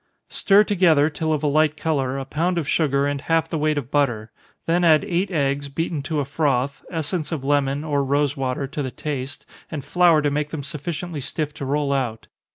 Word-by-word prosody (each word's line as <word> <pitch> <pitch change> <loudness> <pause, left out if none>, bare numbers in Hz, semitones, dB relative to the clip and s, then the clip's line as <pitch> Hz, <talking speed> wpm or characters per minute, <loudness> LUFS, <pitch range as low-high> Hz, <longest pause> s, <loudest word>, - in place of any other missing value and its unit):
_ - - -20
Stir 200 +1 +5
together, 165 -7 +3
till 155 +1 -2
of 155 -1 0
a - - +2
light 155 +1 +2
color, 135 -5 -1
a 135 - -4
pound 170 +6 -1
of 160 -5 -1
sugar, 140 -3 +2
and 145 -1 -2
half 165 +2 +1
the 160 - -3
weight 155 0 +1
of 135 -2 -4
butter 120 -7 0 0.3
then 175 +2 +2
add 160 +1 +5
eight 185 0 0
eggs, 140 -4 -1
beaten 160 +1 -2
to 150 +2 -2
a 140 - -1
froth, 140 -2 -1
essence 165 0 -3
of 155 -5 -3
lemon, 140 0 +1
or 145 -3 0
rosewater, 140 -1 0
to 145 +2 -5
the 130 - -2
taste, 135 0 -5 0.2
and 150 -5 -5
flour 170 -4 +4
to 145 - +1
make 150 +1 -1
them 150 -2 -5
sufficiently 155 +2 -5
stiff 150 +2 -3
to 140 - -6
roll 140 +1 0
out. 120 -5 -2
145 Hz, 210 wpm, -22 LUFS, 140-160 Hz, 0.3 s, Stir